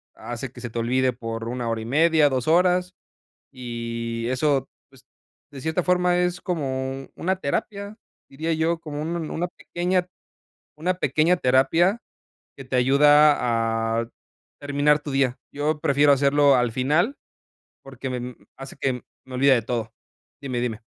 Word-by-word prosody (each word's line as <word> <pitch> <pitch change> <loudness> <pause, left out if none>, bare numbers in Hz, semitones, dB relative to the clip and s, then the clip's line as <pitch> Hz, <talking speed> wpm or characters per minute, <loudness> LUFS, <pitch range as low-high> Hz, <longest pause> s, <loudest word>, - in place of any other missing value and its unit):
hace 120 +1 -6
que 125 - -12
se 120 - -5
te 115 - -8
olvide 130 +2 +1
por 115 -1 -5
1 120 -1 -3
hora 115 -1 -2
y - - -7
media, 155 +3 +4
2 130 -1 -2
horas, 180 +2 +3 0.6
y 115 -2 -5
eso, 135 +1 +1 0.2
pues, 135 -1 -20 0.5
de 135 -2 -9
cierta 160 +3 -1
forma, 180 -1 +2
es 180 0 0
como 135 -6 -3
una 190 +2 -1
terapia, 200 +6 -3 0.3
diría 160 +4 -2
yo, 160 +1 0
como 150 -2 -6
un 170 +2 -3
un 160 -2 -4
una 175 +2 -2
pequeña 180 +1 -2 0.7
una 175 +4 0
pequeña 160 +1 +2
terapia, 165 - +3 0.6
que 135 - -9
te 130 - -3
ayuda 125 -5 +3
a 115 0 -4 0.5
terminar 145 +1 +2
tu 150 - -7
día. 135 -2 +1 0.2
Yo 150 +2 -1
prefiero 145 0 +3
hacerlo 140 0 +4
al 120 -2 +1
final 155 - +1 0.7
porque 135 0 -7
me 125 - -3
mm, 125 0 -7 0.2
hace 135 0 -9
que 135 -2 0 0.3
me 130 - -12
olvide 135 +2 +5
de 120 - +1
todo. 115 -2 -3 0.5
Dime, 130 -3 -3
dime. 115 -2 -3
140 Hz, 160 wpm, -24 LUFS, 125-160 Hz, 0.7 s, olvide